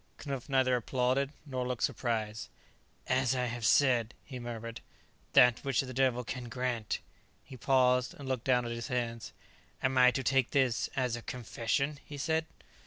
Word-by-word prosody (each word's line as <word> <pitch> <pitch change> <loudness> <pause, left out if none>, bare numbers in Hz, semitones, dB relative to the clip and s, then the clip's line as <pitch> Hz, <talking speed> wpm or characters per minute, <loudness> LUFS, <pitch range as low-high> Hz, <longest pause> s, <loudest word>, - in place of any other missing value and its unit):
Knupf 140 -1 -5
neither 130 -2 +3
applauded, 130 +3 0
nor 130 -3 -3
looked 125 -2 -2
surprised. 110 -3 -2 0.6
"As 130 0 +2
I 125 -1 0
have 120 -1 -4
said," 120 -2 +3
he 130 -3 -8
murmured, 115 -1 -6 0.5
"that 125 -2 +6
which 135 -3 +1
the 130 -1 -7
Devil 125 -1 +2
can 120 0 -6
grant 120 -2 -2 0.2
" - - -36
He 135 - -11
paused 125 +3 +2
and 145 -5 -9
looked 130 -3 -2
down 125 -2 +3
at 120 - -4
his 115 0 -4
hands. 115 -3 -3 0.5
"Am 130 0 +2
I 125 0 +8
to 135 +1 -2
take 135 -2 +2
this 130 -5 +1
as 125 -3 0
a 120 - -6
confession?" 125 +6 -2
he 145 +2 -9
said. 160 +2 0
125 Hz, 175 wpm, -31 LUFS, 120-135 Hz, 0.6 s, I